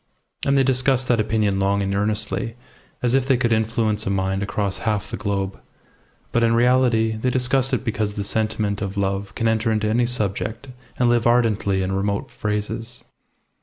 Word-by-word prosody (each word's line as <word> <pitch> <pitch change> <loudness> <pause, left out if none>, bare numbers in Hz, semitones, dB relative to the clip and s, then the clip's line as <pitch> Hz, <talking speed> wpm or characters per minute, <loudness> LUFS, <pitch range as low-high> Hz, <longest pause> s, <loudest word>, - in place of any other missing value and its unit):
And 140 0 +3
they 135 - +5
discussed 130 0 +2
that 120 -2 +3
opinion 105 -2 +1
long 100 +1 +1
and 100 0 -1
earnestly, 105 +1 -1 0.5
as 120 0 +2
if 135 -1 +2
they 135 -2 +4
could 120 -1 0
influence 110 -1 0
a - - +1
mind 95 0 0
across 100 -1 -2
half 105 -3 -2
the - - -2
globe; 100 -2 -3 0.7
but 120 - +2
in 115 0 +3
reality 120 -2 +3
they 115 +4 -1
discussed 130 +1 +1
it 130 0 -1
because 110 -3 -1
the 100 - -2
sentiment 105 -1 -1
of 100 0 -4
love 100 0 -1
can 115 - 0
enter 110 0 +1
into 110 -1 0
any 120 +2 +2
subject 110 +2 -2 0.3
and 125 - +2
live 120 -1 +3
ardently 110 -5 +2
in 95 - -2
remote 100 +1 -2
phrases. 110 +3 -3
110 Hz, 180 wpm, -22 LUFS, 100-120 Hz, 0.7 s, they